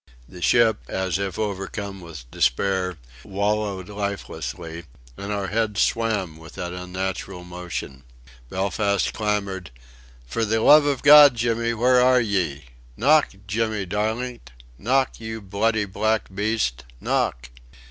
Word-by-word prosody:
The 90 Hz, -, -12 dB
ship, 115 Hz, +5 st, +4 dB
as 95 Hz, 0 st, -2 dB
if 100 Hz, -3 st, -3 dB
overcome 100 Hz, -1 st, -4 dB
with 75 Hz, -8 st, -11 dB
despair, 90 Hz, +6 st, 0 dB, 0.3 s
wallowed 100 Hz, -1 st, -1 dB
lifelessly, 100 Hz, -5 st, -5 dB, 0.3 s
and 100 Hz, +1 st, -6 dB
our 100 Hz, -2 st, -2 dB
heads 110 Hz, -1 st, -1 dB
swam 105 Hz, -8 st, 0 dB
with 80 Hz, 0 st, -13 dB
that 90 Hz, 0 st, -5 dB
unnatural 90 Hz, 0 st, -5 dB
motion. 90 Hz, -7 st, -6 dB, 0.5 s
Belfast 100 Hz, +1 st, 0 dB
clamoured: 100 Hz, -, -2 dB, 0.6 s
"For 65 Hz, -, -2 dB
the 110 Hz, +1 st, +1 dB
love 145 Hz, +6 st, +7 dB
of 140 Hz, -3 st, -1 dB
God, 145 Hz, -2 st, +9 dB
Jimmy, 115 Hz, 0 st, 0 dB
where 125 Hz, +2 st, +4 dB
are 125 Hz, 0 st, +5 dB
ye?... 90 Hz, -, -1 dB, 0.3 s
Knock! 150 Hz, +5 st, +4 dB, 0.2 s
Jimmy 110 Hz, 0 st, -1 dB
darlint!... 110 Hz, -, -3 dB, 0.3 s
Knock! 130 Hz, +4 st, +1 dB
You 110 Hz, 0 st, -6 dB
bloody 105 Hz, +2 st, 0 dB
black 105 Hz, +1 st, -1 dB
beast! 100 Hz, -, -1 dB, 0.2 s
Knock!" 60 Hz, 0 st, -1 dB
100 Hz, 125 wpm, -23 LUFS, 90-110 Hz, 0.6 s, God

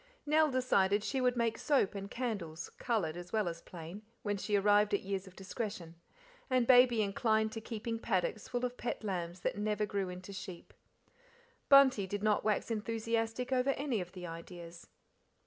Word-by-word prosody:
Nell 305 Hz, +1 st, +4 dB
decided 205 Hz, -6 st, +2 dB
the 265 Hz, +2 st, -1 dB
would 250 Hz, -1 st, +2 dB
make 230 Hz, -1 st, 0 dB
soap 275 Hz, -10 st, +2 dB
and 200 Hz, 0 st, -6 dB
candles, 195 Hz, -11 st, -4 dB
coloured 205 Hz, -10 st, 0 dB
as 175 Hz, 0 st, -8 dB
well 215 Hz, -4 st, +1 dB
as 165 Hz, -1 st, -4 dB
plain, 175 Hz, +3 st, -9 dB, 0.2 s
when 205 Hz, -1 st, 0 dB
she 205 Hz, +1 st, -1 dB
arrived 205 Hz, +1 st, +4 dB
at -, -, -3 dB
years 195 Hz, 0 st, -3 dB
of 185 Hz, -, -14 dB
discretion; 195 Hz, -3 st, -5 dB, 0.6 s
said 255 Hz, -2 st, +3 dB
Baby 245 Hz, -3 st, +6 dB
inclined 220 Hz, +2 st, +1 dB
to 225 Hz, -, -6 dB
keeping 225 Hz, 0 st, -4 dB
paddocks 190 Hz, +1 st, -1 dB
full 245 Hz, 0 st, -1 dB
of 250 Hz, 0 st, -4 dB
pet 240 Hz, -, -4 dB
lambs 180 Hz, -3 st, -3 dB
that -, -, -2 dB
never 210 Hz, 0 st, 0 dB
grew 200 Hz, -2 st, -2 dB
into 185 Hz, +2 st, -8 dB
sheep. 185 Hz, -3 st, -8 dB, 1.0 s
Bunty 265 Hz, -8 st, +7 dB
did, 205 Hz, +2 st, -4 dB
not 215 Hz, -1 st, +2 dB
wax 215 Hz, +2 st, 0 dB
enthusiastic 225 Hz, +2 st, -1 dB
over 255 Hz, +1 st, +2 dB
any 265 Hz, -7 st, -1 dB
of 180 Hz, 0 st, -8 dB
the 180 Hz, -2 st, -7 dB
ideas. 170 Hz, 0 st, -9 dB
210 Hz, 175 wpm, -33 LUFS, 190-235 Hz, 1.0 s, Bunty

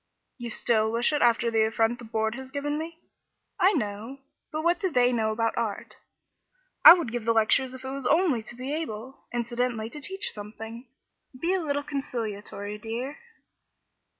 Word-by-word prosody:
"You 240 Hz, -1 st, -5 dB
still 220 Hz, -1 st, +2 dB
wish 235 Hz, +5 st, +1 dB
it 295 Hz, -, +1 dB
after 235 Hz, 0 st, +3 dB
the 225 Hz, -1 st, +3 dB
affront 225 Hz, +2 st, +1 dB
the 240 Hz, -, -9 dB
Board 220 Hz, 0 st, -1 dB
has 265 Hz, +1 st, -8 dB
given 290 Hz, +2 st, -2 dB
me?" 325 Hz, +1 st, -6 dB, 0.6 s
"I 380 Hz, +3 st, +5 dB
know, 215 Hz, -, -3 dB, 0.3 s
but 310 Hz, 0 st, -3 dB
what 345 Hz, +1 st, +2 dB
do 380 Hz, -, 0 dB
they 250 Hz, -5 st, +3 dB
know 220 Hz, -3 st, +1 dB
about 225 Hz, +1 st, 0 dB
art? 225 Hz, -4 st, -3 dB, 0.9 s
I -, -, +13 dB
would 340 Hz, -10 st, -1 dB
give 240 Hz, -1 st, -3 dB
the 230 Hz, 0 st, +2 dB
lectures 255 Hz, +4 st, +3 dB
if 260 Hz, 0 st, -10 dB
it 265 Hz, -, -4 dB
was 270 Hz, -2 st, -3 dB
only 315 Hz, -6 st, +3 dB
to 220 Hz, +3 st, -10 dB
be 255 Hz, +4 st, -4 dB
able 260 Hz, -5 st, -5 dB
incidentally 240 Hz, -1 st, -2 dB
to 295 Hz, -, -8 dB
teach 385 Hz, +6 st, -1 dB
them 210 Hz, 0 st, -8 dB
something. 230 Hz, +3 st, -8 dB, 0.5 s
Be 345 Hz, +5 st, +1 dB
a 380 Hz, -, +1 dB
little 285 Hz, -2 st, -1 dB
conciliatory, 210 Hz, -7 st, -4 dB
dear." 235 Hz, -, -5 dB
240 Hz, 180 wpm, -27 LUFS, 225-285 Hz, 0.9 s, I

